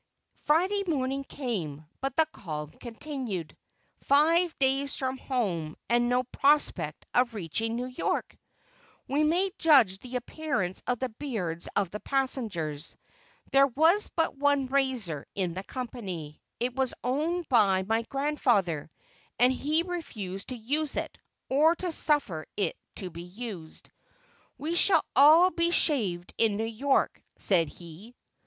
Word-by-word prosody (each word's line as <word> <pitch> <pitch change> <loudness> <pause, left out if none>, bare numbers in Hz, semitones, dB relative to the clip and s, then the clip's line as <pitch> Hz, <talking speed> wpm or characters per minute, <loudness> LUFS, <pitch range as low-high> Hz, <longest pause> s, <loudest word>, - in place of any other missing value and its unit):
Friday 370 +7 +2
morning 275 -3 -1
came, 180 - -4
but 270 -1 -3
the 320 - +4
calm 150 -4 -6
continued. 235 - -6 0.5
Five 325 +4 +3
days 270 0 +1
from 260 0 -3
home, 180 - -2
and 240 0 +3
no 250 +1 +2
prospect 255 - +2
of 245 -2 +2
reaching 220 +5 -2
New 245 +1 -2
York! 255 0 -2 0.7
We 290 +3 +1
may 355 +5 +2
judge 255 - +5
the 250 +3 -9
appearance 250 - -2
of 245 0 +1
the 260 +2 -2
beards 215 - -3
of 195 -4 +1
the 210 - -5
passengers. 210 - -2 0.5
There 275 0 +6
was 320 - +3
but 325 -3 +1
one 285 -1 +2
razor 255 - -1
in 185 -4 -1
the 190 +2 -5
company; 195 - -6 0.2
it 245 +1 -2
was 265 -2 0
owned 315 +7 -1
by 200 -7 +4
my 225 +4 +1
grandfather, 230 - 0 0.5
and 250 +1 +5
he 305 +5 +1
refused 215 - -6
to 255 - -5
use 285 +6 -1
it, - - -3 0.3
or 310 +5 +4
to 360 0 -3
suffer 285 - +1
it 200 - 0 0.2
to 185 -3 -5
be 170 +1 -8
used. 180 -3 -8 0.7
"We 315 +3 -3
shall 345 -1 +4
all 315 +7 +7
be 335 -1 +1
shaved 210 - +1
in 215 -3 +3
New 220 - -1
York," 230 +5 0 0.2
said 170 -6 +4
he. 175 +10 -12
250 Hz, 140 wpm, -28 LUFS, 190-290 Hz, 0.7 s, all